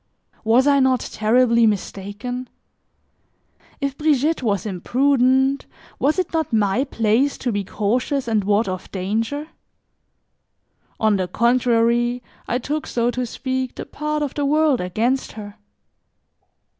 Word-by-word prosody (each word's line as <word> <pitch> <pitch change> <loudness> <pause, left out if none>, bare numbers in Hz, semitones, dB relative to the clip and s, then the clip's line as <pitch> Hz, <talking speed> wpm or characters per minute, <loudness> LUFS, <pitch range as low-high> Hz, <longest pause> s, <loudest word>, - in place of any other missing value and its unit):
Was 230 +4 +4
I 285 -1 +4
not 260 -1 +3
terribly 235 +1 +2
mistaken? 215 +5 -4 1.3
If 280 -2 -2
Brigitte 300 +1 +1
was 205 -5 -1
imprudent, 265 +6 +2 0.3
was 300 +5 +2
it 365 -3 -2
not 320 -3 -1
my 215 +4 +2
place 230 +3 +1
to 245 - -2
be 205 -2 -1
cautious 245 +7 -1
and 220 -3 +1
ward 205 +2 +2
off 185 -1 -5
danger? 225 +11 -2 1.5
On 215 -2 +3
the 185 -1 -1
contrary, 240 +1 +2 0.2
I 240 - 0
took, 295 +5 -3
so 240 0 0
to 250 0 -3
speak, 260 +1 -3
the - - -6
part 300 0 -3
of 285 - -3
the 290 - -2
world 300 -3 +2
against 225 +9 -1
her. 205 -1 -9
245 Hz, 130 wpm, -21 LUFS, 215-275 Hz, 1.5 s, Was